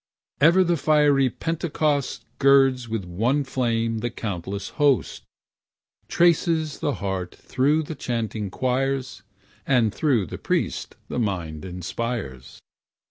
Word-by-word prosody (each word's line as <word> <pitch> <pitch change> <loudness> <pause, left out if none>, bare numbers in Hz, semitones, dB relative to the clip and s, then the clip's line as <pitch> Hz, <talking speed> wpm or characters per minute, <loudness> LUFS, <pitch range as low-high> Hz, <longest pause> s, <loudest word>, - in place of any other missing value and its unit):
Ever 170 +6 +6
the 175 -1 +1
fiery 145 -3 +3
Pentecost 155 -1 -1
Girds 135 -3 +4
with 110 -4 -3
one 115 +12 0
flame 115 -4 -1
the 120 +2 -2
countless 100 -3 -5
host, 140 -3 +2 0.9
Trances 165 -2 +2
the 145 - -1
heart 95 -2 -4
through 145 +5 +1
chanting 115 -8 -3
choirs, 130 +3 -1 0.4
And 115 -3 +2
through 130 -10 +1
the - - -8
priest - - -2
the - - -3
mind 85 -8 -3
inspires. 90 - -5
125 Hz, 110 wpm, -24 LUFS, 100-145 Hz, 0.9 s, Ever